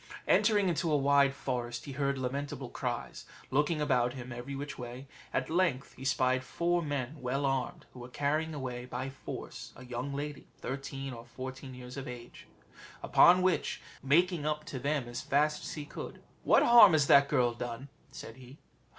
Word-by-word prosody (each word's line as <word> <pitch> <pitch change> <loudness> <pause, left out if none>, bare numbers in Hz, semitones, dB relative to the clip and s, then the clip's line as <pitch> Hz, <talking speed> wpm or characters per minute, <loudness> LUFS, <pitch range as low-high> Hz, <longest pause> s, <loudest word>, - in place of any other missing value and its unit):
Entering 205 -2 +4
into 170 -1 0
a 150 - +4
wide 140 0 +4
forest, 120 -3 -3
he 140 - -6
heard 140 0 -1
lamentable 135 +2 -4
cries. - - -4 0.3
Looking 150 +4 +2
about 125 -5 +2
him 130 -1 -8
every 120 +3 -6
way, 135 -2 -6 0.3
at - - -1
length 160 -6 0
he 130 - -11
spied 130 0 +2
four 175 +5 0
men 145 -2 -3
well 135 +3 -1
armed, 135 -1 -1
who 125 - -11
were 120 +1 -9
carrying 155 +4 -1
away 125 -3 -5
by 130 +2 -4
force 135 - -8
a 125 - -11
young 125 +3 -4
lady, 145 +1 -5
thirteen 135 0 -5
or 115 -1 -9
fourteen 130 +1 -7
years 125 +1 -9
of 135 - -5
age; 120 -1 -10 0.6
upon 180 +1 +6
which, 185 -2 +1 0.2
making 165 +4 +3
up 150 0 -2
to 135 - -5
them 140 -1 -1
as 120 0 -5
fast 150 +2 +1
as - - -6
he 150 -2 -6
could, - - -8 0.2
"What - - +5
harm 235 -6 +9
has 150 -3 +4
that 140 0 +6
girl 120 -1 +2
done?" 120 +2 -6 0.2
said 115 - -10
he. 130 +2 -13
135 Hz, 175 wpm, -31 LUFS, 125-150 Hz, 0.6 s, harm